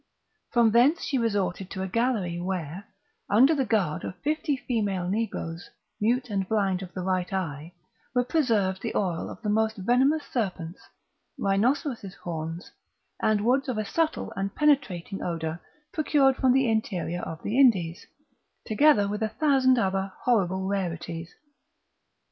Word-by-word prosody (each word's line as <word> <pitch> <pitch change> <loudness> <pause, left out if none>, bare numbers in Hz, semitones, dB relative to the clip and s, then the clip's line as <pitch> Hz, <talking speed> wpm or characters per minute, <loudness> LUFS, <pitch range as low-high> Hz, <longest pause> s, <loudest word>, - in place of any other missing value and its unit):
From 235 -3 +4
thence 255 +9 +4
she 270 - 0
resorted 195 -5 -1
to 190 -1 -4
a - - -2
gallery 205 -5 0
where, 180 0 -4 0.4
under 255 +10 +6
the 270 -5 0
guard 190 -9 0
of 180 - -6
fifty 300 -1 0
female 205 -8 -1
negroes, 185 -5 -3 0.3
mute 240 +2 +1
and 195 -2 -1
blind 195 -4 +1
of 185 -2 -8
the 185 - -3
right 185 0 -1
eye, 165 -3 -4 0.4
were 245 - +4
preserved 225 - +1
the - - -4
oil 180 -5 -1
of - - -9
the 210 - -1
most 220 +1 +1
venomous 260 +9 +2
serpents, 180 -7 -3 0.6
rhinoceros' 220 - 0
horns, 165 +1 -6 0.5
and 215 -1 +2
woods 265 +3 +2
of 245 - -2
a 215 - -1
subtle 320 +8 -1
and 195 +1 -3
penetrating 215 - +1
odour 165 -1 -3 0.3
procured 285 -4 +3
from 260 -1 +3
the 265 0 +3
interior 185 -6 -1
of 160 0 -7
the 225 +6 0
Indies, 185 -11 +3 0.6
together 220 -3 +4
with 210 +2 -3
a 220 - 0
thousand 260 0 +3
other 195 -2 0
horrible 190 -6 +2
rarities. 170 -3 -3
205 Hz, 150 wpm, -26 LUFS, 185-250 Hz, 0.6 s, under